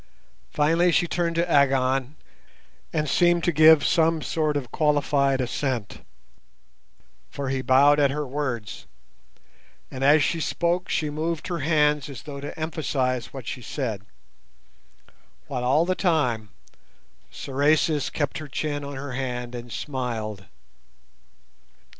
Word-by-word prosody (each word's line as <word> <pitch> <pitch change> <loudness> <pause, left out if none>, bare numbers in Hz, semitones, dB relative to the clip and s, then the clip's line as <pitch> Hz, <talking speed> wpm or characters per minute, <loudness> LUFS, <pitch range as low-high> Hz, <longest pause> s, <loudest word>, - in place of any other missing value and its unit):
Finally 165 +4 +2
she 175 - +3
turned 170 0 -1
to 170 +1 +1
Agon 135 -2 +2 0.8
and 155 -1 -1
seemed 175 +4 +3
to 175 - +2
give 155 -1 +6
some 165 -1 +2
sort 155 -2 0
of 125 -5 -6
qualified 145 -3 +1
assent, 125 -3 -3 1.3
for 140 - -5
he 130 0 -1
bowed 140 +3 +5
at 140 -1 +4
her 150 +2 -3
words; 130 -6 -4 1.0
and 130 0 -5
as 145 +2 +5
she 165 - 0
spoke 170 +3 -1
she 150 -2 -1
moved 160 +3 -3
her 175 -2 -2
hands 150 -1 +2
as 140 - -9
though 140 -2 -7
to 145 - -7
emphasize 135 -6 -1
what 135 -4 -8
she 130 - -5
said; 115 -6 -4 1.4
while 125 -3 -4
all 140 +7 +3
the 185 - +1
time 135 - 0 0.8
Sorais 145 +1 +1
kept 145 -1 -2
her 155 - -8
chin 145 +1 -3
on 140 0 -6
her 135 +1 -6
hand 125 -2 -4
and 120 0 -8
smiled. 115 -8 -4
145 Hz, 130 wpm, -24 LUFS, 130-155 Hz, 1.4 s, give